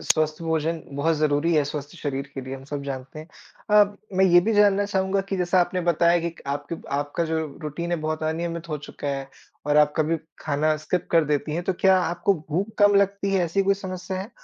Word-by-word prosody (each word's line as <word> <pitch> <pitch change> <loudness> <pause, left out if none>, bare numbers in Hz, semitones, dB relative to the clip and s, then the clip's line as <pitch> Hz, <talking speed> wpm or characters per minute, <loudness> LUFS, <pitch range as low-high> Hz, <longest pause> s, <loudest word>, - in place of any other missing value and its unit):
स्वस्थ 155 0 +1
भोजन 160 0 -1 0.2
बहुत 160 +3 +2
ज़रूरी 150 +2 +1
है, 150 - +4
स्वस्थ 145 0 -5
शरीर 140 -3 -3
के 135 - -4
लिए 130 +1 -6
हम 135 0 -10
सब 145 0 -5
जानते 135 +1 -6
हैं। 155 +3 -10 0.4
अ, 205 -1 +5 0.2
मैं 190 - +5
ये 175 -1 +6
भी 225 +5 0
जानना 205 -1 +4
चाहूँगा 190 -1 0
कि 195 - -1
जैसा 180 0 +2
आपने 180 +1 0
बताया 170 +1 +4
कि 165 - -10 0.2
आपकी 145 +4 -4 0.2
आपका 145 +3 -1
जो 160 0 -1 0.3
रूटीन 170 +3 -4
है 175 - +1
बहुत 155 0 -3
अनियमित 165 +1 -3
हो 150 -1 -3
चुका 145 - -6
है 135 -1 -3 0.4
और 150 0 +2
आप 150 0 +5
कभी 160 +1 +1 0.2
खाना 155 +1 +1
स्किप 155 +4 -2
कर 165 -2 +4
देती 150 +1 -1
हैं, 175 - -2
तो 190 - +1
क्या 190 -1 +5
आपको 175 +2 +1
भूख 190 +8 -2
कम 205 -1 +6
लगती 200 0 +2
है, 185 - +3
ऐसी 185 +4 +1
कोई 195 +1 +3
समस्या 185 -1 -5
है? 200 +5 -7
165 Hz, 220 wpm, -24 LUFS, 150-190 Hz, 0.4 s, ये